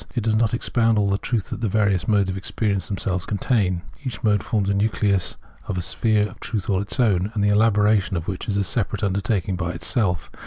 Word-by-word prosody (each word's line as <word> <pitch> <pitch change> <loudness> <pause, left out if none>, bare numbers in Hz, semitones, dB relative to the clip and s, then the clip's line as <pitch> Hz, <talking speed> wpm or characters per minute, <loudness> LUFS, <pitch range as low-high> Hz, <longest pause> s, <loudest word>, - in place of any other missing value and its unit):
It 120 - 0
does 110 -1 +2
not 115 +1 +2
expound 115 -2 +1
all 100 -1 +2
the 100 - +1
truth 115 -6 -2
that - - -5
the 110 - 0
various 100 -3 +1
modes 100 -3 +3
of 95 - -3
experience 100 0 -1
themselves 95 -3 -2
contain. 100 -4 0 0.2
Each 120 -8 -5
mode 105 -2 +3
forms 105 -3 -1
a 100 - +2
nucleus 100 -2 +1 0.3
of - - -2
a 90 - -2
sphere 105 +2 +1
of - - -14
truth 105 -3 -3
all 95 -1 +1
its 105 +6 -4
own, 100 -4 +2
the 105 -1 +2
elaboration 105 -2 +3
of 80 - -5
which 95 -2 -4
is 100 -2 0
a 100 - +2
separate 105 0 -1
undertaking 100 -1 0
by 90 -1 -3
itself. 90 - -1
100 Hz, 220 wpm, -23 LUFS, 95-110 Hz, 0.3 s, modes